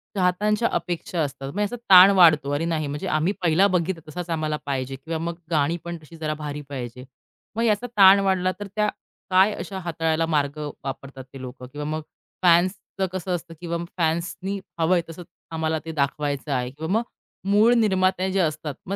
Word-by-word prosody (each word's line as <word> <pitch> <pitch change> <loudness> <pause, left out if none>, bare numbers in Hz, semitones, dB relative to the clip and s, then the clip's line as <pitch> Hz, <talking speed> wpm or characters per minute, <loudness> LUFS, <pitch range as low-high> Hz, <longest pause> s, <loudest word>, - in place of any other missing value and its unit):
चाहत्यांच्या 205 +4 +2
अपेक्षा 175 0 -2
असतात. 135 -1 -4
मग 205 - 0
असा 205 +4 -2
ताण 190 +1 +10
वाढतो, 155 -5 +6
अरे 145 +3 0
नाही 160 -3 -1
म्हणजे 145 +6 -4
आम्ही 170 +4 +1
पहिला 175 +3 +4
बघितला 180 -2 -1
तसाच 175 +2 -6
आम्हाला 155 -2 -1
पाहिजे 135 -1 -2
किंवा 160 +4 -5
मग 170 +1 -3 0.2
गाणी 160 +2 +2
पण 170 0 -5
तशी 160 +2 -14
जरा 155 -1 -2
भारी 150 0 -4
पाहिजे. 125 -2 -6 0.5
मग 230 - 0
याचा 225 +1 +1
ताण 195 0 +8
वाढला 190 -2 +1
तर 205 - -5
त्या 210 -1 +2 0.4
काय 190 +3 +5
अशा 190 0 -6
हाताळायला 165 -2 0
मार्ग 150 -2 0 0.3
वापरतात 135 0 -7
ते 135 - -9
लोकं? 125 0 -8
किंवा 145 +2 -6
मग 155 +1 -2 0.4
फॅन्सचं 185 +2 +2
कसं 185 0 -4
असतं? 170 0 -8
किंवा 170 -1 -2 0.2
फॅन्सनी 175 +4 -1 0.2
हवंय 175 +2 +3
तसंच 170 +2 -9 0.3
आम्हाला 160 -1 -1
ते 160 - -4
दाखवायचं 145 0 -2
आहे 125 -1 -1
किंवा 160 +5 -5
मग 230 - 0 0.5
मूळ 220 +4 +5
निर्माते 190 -4 +2
जे 195 - 0
असतात. 155 -4 -1
मग 195 - -3
165 Hz, 180 wpm, -24 LUFS, 150-185 Hz, 0.5 s, ताण